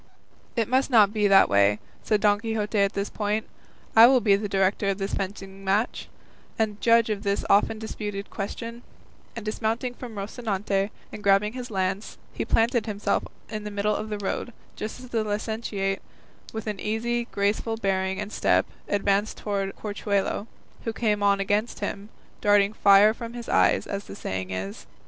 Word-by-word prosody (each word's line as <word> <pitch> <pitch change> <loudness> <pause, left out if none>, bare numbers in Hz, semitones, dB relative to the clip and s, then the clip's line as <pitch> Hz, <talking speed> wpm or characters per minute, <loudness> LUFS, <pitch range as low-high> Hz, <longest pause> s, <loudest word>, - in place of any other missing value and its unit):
"It 230 -3 +1
must 260 +3 +2
not 215 -5 +5
be 210 -2 +2
that 195 -1 +7
way," 100 +1 +4 0.3
said 210 -2 +1
Don 205 -1 +4
Quixote 220 -1 -1
at 200 -1 +3
this 200 +1 -3
point; 210 +1 -1 0.5
"I 225 +1 +10
will 260 0 +5
be 205 -3 +4
the 205 +1 -3
director 195 +1 +1
of 195 - 0
this 195 0 -3
fencing 195 0 -5
match, 200 +5 0 0.5
and 215 -2 -1
judge 230 -1 +4
of 205 -2 -2
this 200 -1 -1
often 205 +2 +4
disputed 210 -2 -5
question;" 230 +3 -5 0.5
and 230 -2 -6
dismounting 225 +3 -1
from 240 -2 -9
Rocinante 200 -1 -2 0.2
and - - -8
grasping 200 +2 +3
his 250 -1 -6
lance, 195 0 -2 0.2
he - - -2
planted 230 0 +2
himself 205 -1 0 0.2
in 215 -2 -5
the 210 - -4
middle 205 +1 0
of 215 - -4
the 210 - -2
road, 205 +4 -3 0.2
just 215 +3 -5
as 255 -1 -11
the 225 -2 0
licentiate, 205 -2 -2 0.5
with 220 -1 -5
an 210 -3 -3
easy, 235 +2 -1
graceful 210 +2 -1
bearing 190 -2 0
and 210 0 -4
step, - - +3 0.2
advanced 205 +1 +1
towards 195 -2 -3
Corchuelo, 205 0 -1 0.4
who 225 - -2
came 210 -3 0
on 200 -1 +3
against 205 +4 0
him, 205 0 -4 0.3
darting 205 0 +4
fire 205 +1 +6
from 230 0 -7
his 240 -1 -7
eyes, - - +3
as 200 0 -4
the - - -9
saying 95 - -4
is. 95 +1 -5
210 Hz, 175 wpm, -26 LUFS, 200-225 Hz, 0.5 s, I